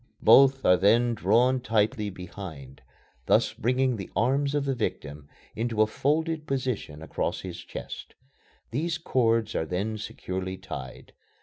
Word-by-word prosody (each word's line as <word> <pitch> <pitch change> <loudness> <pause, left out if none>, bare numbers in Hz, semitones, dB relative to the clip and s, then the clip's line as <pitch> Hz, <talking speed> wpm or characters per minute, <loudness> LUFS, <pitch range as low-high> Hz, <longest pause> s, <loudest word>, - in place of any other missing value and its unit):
Both 135 0 +6
are 90 - +6
then 115 +6 +4
drawn 120 +6 +3
tightly 110 -2 +1
behind, 90 -7 -9 0.5
thus - - +3
bringing 125 +2 +1
the 95 - -7
arms 140 +5 +1
of 145 -1 0
the 135 - 0
victim 75 - -4 0.3
into 115 -1 +1
a - - +3
folded 155 +7 -1
position 125 - -3
across - - -2
his 90 -2 -7
chest. - - -8 0.6
These 160 +7 -1
cords 115 - +1
are 80 - -1
then 105 +5 -2
securely 95 -2 -5
tied. 80 -9 -9
110 Hz, 135 wpm, -27 LUFS, 95-130 Hz, 0.6 s, Both